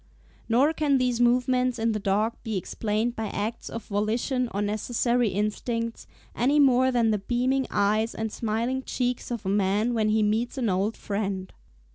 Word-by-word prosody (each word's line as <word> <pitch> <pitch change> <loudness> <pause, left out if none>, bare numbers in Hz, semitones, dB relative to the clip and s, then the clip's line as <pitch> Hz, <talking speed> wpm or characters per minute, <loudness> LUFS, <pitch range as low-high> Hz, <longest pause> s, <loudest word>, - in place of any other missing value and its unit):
Nor 265 +7 +4
can 295 -3 +2
these 250 -2 0
movements 250 +1 +2
in 225 0 +1
the 215 - -2
dog 210 +3 +1
be 220 -3 -3
explained 215 +5 -2
by 220 -1 -3
acts 215 +3 -4
of 230 -2 -6
volition 230 +5 -1
or 200 - -3
necessary 230 +3 0
instincts, 230 +3 -2 0.3
any 275 +5 +2
more 260 -2 +5
than 235 -3 +2
the 210 - +1
beaming 255 +5 0
eyes 215 +3 +1
and 220 -1 -3
smiling 235 +5 -1
cheeks 250 -1 -2
of 235 -4 -4
a - - 0
man 205 +4 +1
when 215 -2 +1
he 215 0 +2
meets 220 +5 0
an 240 -4 0
old 195 +4 0
friend. 200 -2 -3
230 Hz, 170 wpm, -26 LUFS, 210-245 Hz, 0.3 s, more